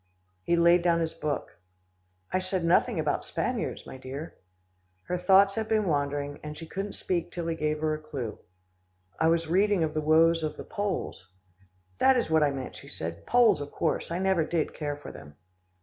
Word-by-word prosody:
He 170 Hz, -, +1 dB
laid 170 Hz, +1 st, +5 dB
down 170 Hz, -1 st, +3 dB
his 165 Hz, -1 st, -1 dB
book. 145 Hz, -, -4 dB, 0.7 s
"I 185 Hz, -, +3 dB
said 185 Hz, -1 st, -2 dB
nothing 170 Hz, -, +3 dB
about -, -, 0 dB
Spaniards, -, -, -3 dB
my -, -, -9 dB
dear." 135 Hz, +5 st, -7 dB, 0.7 s
Her 180 Hz, -, -2 dB
thoughts 195 Hz, +2 st, +5 dB
had 220 Hz, 0 st, -2 dB
been 215 Hz, -1 st, +2 dB
wandering, 145 Hz, -2 st, -1 dB
and 150 Hz, 0 st, -7 dB
she 165 Hz, -, -7 dB
couldn't 195 Hz, +5 st, -5 dB
speak 175 Hz, -3 st, -2 dB
till 170 Hz, -1 st, -4 dB
he 165 Hz, 0 st, -1 dB
gave 155 Hz, -1 st, -1 dB
her 155 Hz, 0 st, +1 dB
a 155 Hz, -, -3 dB
clue. 140 Hz, -8 st, -6 dB, 0.8 s
"I 160 Hz, -, +3 dB
was 165 Hz, 0 st, +2 dB
reading 190 Hz, +2 st, +2 dB
of 155 Hz, -1 st, -1 dB
the 155 Hz, -, -1 dB
woes 165 Hz, +2 st, +4 dB
of 155 Hz, -1 st, -3 dB
the -, -, -6 dB
Poles." 200 Hz, -, -4 dB, 0.7 s
"That 265 Hz, -1 st, +5 dB
is 235 Hz, -9 st, -1 dB
what 160 Hz, -1 st, +4 dB
I 150 Hz, -, +4 dB
meant," 135 Hz, -2 st, -6 dB
she -, -, -12 dB
said, 85 Hz, +1 st, -6 dB
"Poles 240 Hz, -11 st, +4 dB
of 145 Hz, -, -6 dB
course, 165 Hz, -, -1 dB
I 170 Hz, -, -2 dB
never 190 Hz, -3 st, +2 dB
did 160 Hz, 0 st, -1 dB
care 145 Hz, -2 st, -3 dB
for 145 Hz, -, -9 dB
them." 75 Hz, -1 st, -12 dB
165 Hz, 195 wpm, -28 LUFS, 150-180 Hz, 0.8 s, laid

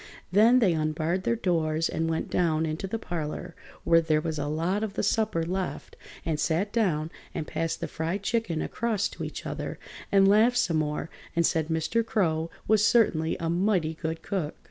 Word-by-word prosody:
Then 220 Hz, +6 st, +6 dB
they 205 Hz, -8 st, +4 dB
unbarred 160 Hz, +3 st, -1 dB
their 235 Hz, -, +2 dB
doors 165 Hz, -6 st, +1 dB
and 165 Hz, 0 st, -1 dB
went 160 Hz, -, -2 dB
down 160 Hz, -2 st, +2 dB
into 160 Hz, +4 st, -3 dB
the 225 Hz, -, -2 dB
parlor, 175 Hz, -3 st, -5 dB, 0.3 s
where 165 Hz, 0 st, +5 dB
there 155 Hz, -2 st, +2 dB
was 155 Hz, -1 st, -3 dB
a 145 Hz, -, -2 dB
lot 165 Hz, +7 st, 0 dB
of 215 Hz, -2 st, -4 dB
the -, -, -1 dB
supper 210 Hz, -5 st, +1 dB
left, 180 Hz, -4 st, -4 dB, 0.3 s
and 155 Hz, -3 st, -1 dB
sat 180 Hz, +7 st, 0 dB
down 165 Hz, -9 st, +1 dB, 0.2 s
and 155 Hz, -, -2 dB
passed 165 Hz, +1 st, -3 dB
the -, -, -2 dB
fried 170 Hz, +5 st, -3 dB
chicken 220 Hz, -9 st, 0 dB
across 220 Hz, -3 st, -1 dB
to -, -, -7 dB
each -, -, -6 dB
other -, -, -4 dB, 0.3 s
and 195 Hz, -1 st, +6 dB
laughed 220 Hz, +5 st, +5 dB
some 165 Hz, -8 st, +2 dB
more 150 Hz, +1 st, -2 dB, 0.2 s
and 170 Hz, 0 st, +3 dB
said 160 Hz, -1 st, +1 dB
Mr. 160 Hz, +8 st, 0 dB
Crow 165 Hz, -8 st, 0 dB, 0.2 s
was 215 Hz, -1 st, +4 dB
certainly 205 Hz, -9 st, +3 dB
a 165 Hz, -, -2 dB
mighty 175 Hz, -2 st, +1 dB
good 160 Hz, 0 st, -4 dB
cook. 175 Hz, -7 st, -2 dB
170 Hz, 190 wpm, -27 LUFS, 160-200 Hz, 0.3 s, Then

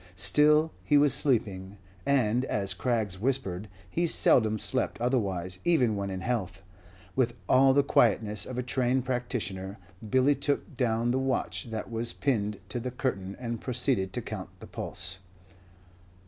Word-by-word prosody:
Still 150 Hz, -, +4 dB
he 145 Hz, -, +3 dB
was 145 Hz, -2 st, +4 dB
sleeping; 105 Hz, -9 st, 0 dB, 0.3 s
and, 125 Hz, -3 st, +2 dB
as 100 Hz, -5 st, 0 dB
Craggs 105 Hz, -3 st, -1 dB
whispered, 110 Hz, -6 st, -1 dB, 0.2 s
he 170 Hz, -, 0 dB
seldom 110 Hz, -8 st, +4 dB
slept 130 Hz, +4 st, -1 dB
otherwise, 95 Hz, -7 st, -1 dB
even 130 Hz, -11 st, +3 dB
when 100 Hz, -1 st, -3 dB
in 95 Hz, -1 st, -4 dB
health. 95 Hz, -5 st, -3 dB, 0.5 s
With 120 Hz, -3 st, +1 dB
all 135 Hz, +1 st, +5 dB
the 140 Hz, -, +5 dB
quietness 105 Hz, -5 st, +2 dB
of 130 Hz, -, -6 dB
a 125 Hz, -, -1 dB
trained 125 Hz, +1 st, 0 dB
practitioner, 110 Hz, -6 st, -3 dB, 0.3 s
Billy 130 Hz, +5 st, +4 dB
took 145 Hz, 0 st, -2 dB
down 120 Hz, -1 st, +1 dB
the 130 Hz, -, +1 dB
watch 135 Hz, 0 st, -1 dB
that 110 Hz, 0 st, -6 dB
was 115 Hz, +1 st, 0 dB
pinned 105 Hz, -7 st, -1 dB
to 120 Hz, -, -3 dB
the 125 Hz, +2 st, -4 dB
curtain 100 Hz, -7 st, -3 dB
and 115 Hz, -2 st, -4 dB
proceeded 125 Hz, -6 st, +1 dB
to -, -, -3 dB
count -, -, -6 dB
the -, -, -10 dB
pulse. -, -, -5 dB
120 Hz, 150 wpm, -28 LUFS, 100-130 Hz, 0.5 s, all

